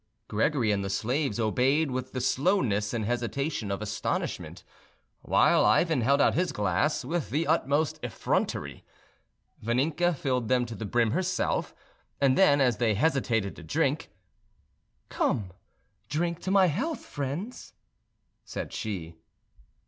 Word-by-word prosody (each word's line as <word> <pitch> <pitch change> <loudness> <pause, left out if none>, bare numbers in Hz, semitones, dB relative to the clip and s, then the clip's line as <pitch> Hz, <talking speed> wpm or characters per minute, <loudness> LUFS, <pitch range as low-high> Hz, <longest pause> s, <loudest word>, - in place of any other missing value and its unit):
Gregory 115 +1 +1
and 100 -1 0
the 100 - -3
slaves 120 +4 -1
obeyed 130 +7 +2
with 130 0 -4
the 130 - -3
slowness 125 - +1
and 115 -3 -2
hesitation 120 +1 -2
of 100 +2 -3
astonishment, 105 0 -3 0.6
while - - +4
Ivan 160 -7 +3
held 140 +5 +3
out 145 - +4
his 180 +1 0
glass 105 - 0
with 165 +2 -2
the 155 +4 0
utmost 150 -1 +1
effrontery. - - -2 0.8
Vaninka 150 +9 +1
filled 130 -4 -1
them 125 +1 +2
to 115 - -7
the 110 0 -6
brim 115 +1 +2
herself, 185 +2 -1 0.4
and 135 -2 +4
then, 145 -7 +5
as 125 -5 +3
they 110 -1 +2
hesitated 120 -6 +1
to - - -10
drink, 80 - -1 1.0
"Come, 95 -5 -1 0.6
drink 170 +2 -1
to 185 - -5
my 195 -1 +5
health, 215 - -2
friends," 145 - -5 0.7
said - - -6
she. 90 -6 -4
130 Hz, 135 wpm, -28 LUFS, 110-160 Hz, 1.0 s, then